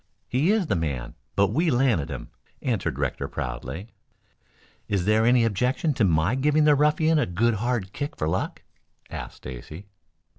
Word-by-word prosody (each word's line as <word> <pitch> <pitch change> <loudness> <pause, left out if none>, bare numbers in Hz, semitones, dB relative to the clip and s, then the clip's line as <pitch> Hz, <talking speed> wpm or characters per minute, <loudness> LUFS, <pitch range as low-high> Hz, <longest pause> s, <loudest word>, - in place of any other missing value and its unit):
"He 145 +10 +2
is 215 -3 +2
the 155 - 0
man, 70 -8 -3 0.2
but 100 -1 +3
we 165 +5 +2
landed 120 - +2
him," - - -7 0.3
answered 110 - -1
Rector 70 -3 -2
proudly. 65 - -5 1.0
"Is 100 -3 0
there 110 +2 +3
any 120 -1 +5
objection 125 - +1
to 125 - +1
my 85 +2 +3
giving 150 +3 +3
the 150 0 +6
ruffian 150 +2 +3
a 130 - +1
good 115 +7 +2
hard 120 -6 -1
kick 145 0 -4
for 75 - -2
luck?" 80 - -2 0.5
asked - - -6
Stacy. 65 +9 -9
115 Hz, 160 wpm, -25 LUFS, 85-145 Hz, 1.0 s, the